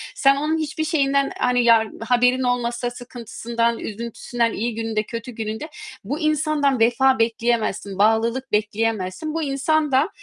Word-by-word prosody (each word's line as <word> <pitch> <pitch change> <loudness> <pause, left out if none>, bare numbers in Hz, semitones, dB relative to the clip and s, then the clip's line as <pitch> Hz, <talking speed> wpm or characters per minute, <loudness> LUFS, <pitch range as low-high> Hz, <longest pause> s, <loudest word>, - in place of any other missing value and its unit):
Sen 275 0 +4
onun 305 +3 0
hiçbir 310 0 -2
şeyinden, 280 -3 +1
hani 245 -1 +2
yar 230 -2 +5 0.2
haberin 250 +1 +3
olmasa, 245 -1 -1
sıkıntısından, 235 -1 -3
üzüntüsünden, 230 +1 -3
iyi 230 +1 -2
gününde, 225 -1 -1
kötü 230 +2 -7
gününde 220 +4 -5 0.4
bu 295 - -3
insandan 305 -3 +1
vefa 245 +3 +3
bekleyemezsin, 230 -2 +1 0.2
bağlılık 230 +5 +1
bekleyemezsin. 215 +5 -1
Bu 325 - -1
insan 295 +2 0
da, 270 +7 +3
245 Hz, 135 wpm, -22 LUFS, 225-275 Hz, 0.4 s, yar